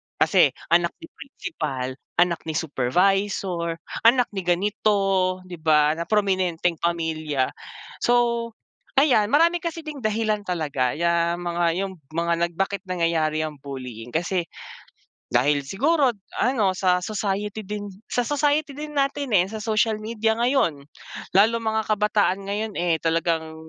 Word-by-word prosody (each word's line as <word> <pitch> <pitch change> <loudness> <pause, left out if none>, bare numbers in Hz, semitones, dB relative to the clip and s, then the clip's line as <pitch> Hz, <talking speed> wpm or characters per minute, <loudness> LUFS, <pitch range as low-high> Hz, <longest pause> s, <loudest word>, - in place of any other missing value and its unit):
Kasi - - +4 0.2
anak 170 0 +3
ni 330 - -8
principal, 130 - -5 0.2
anak 175 -1 +3
ni 160 - -3
supervisor, 175 +4 0 0.3
anak 245 +1 +4
ni 195 - -4
ganito, 190 0 +1
'di 180 -2 -10
ba, 150 -1 +4
na 170 - -3
prominenteng 185 -5 +1
pamilya. 155 -5 -1 0.5
So, 235 -1 +2 0.5
ayan 265 -7 +4
marami 335 +8 +4
kasi 335 -1 -4
ding 305 -2 -7
dahilan 215 -2 -1
talaga 145 -8 -1
'yang 170 +1 +1
mga, 175 0 -1 0.2
yung 190 -2 -6 0.2
mga 170 0 +1
nag 170 - -18
bakit 195 +2 -1
nangyayari 165 -3 0
'yang 155 -2 -6
bullying 125 -4 -8
kasi, 175 +1 0 0.8
dahil 140 +4 +2
siguro 275 - +2 0.2
ano 225 -7 +2
sa 180 -1 +2
society 205 +2 -3
din, 205 +1 -5 0.2
sa 245 -2 0
society 295 +1 +1
din 300 +1 -6
natin, 280 -1 -1
eh, 185 -3 +4
sa 215 +1 -6
social 220 0 +2
media 220 0 0
ngayon. 235 - +1 0.5
Lalo 225 +4 +4
mga 220 0 0
kabataan 205 -2 +1
ngayon, 205 +2 -3
eh, 170 -2 +1
talagang 165 -1 0
190 Hz, 135 wpm, -24 LUFS, 165-220 Hz, 0.8 s, Kasi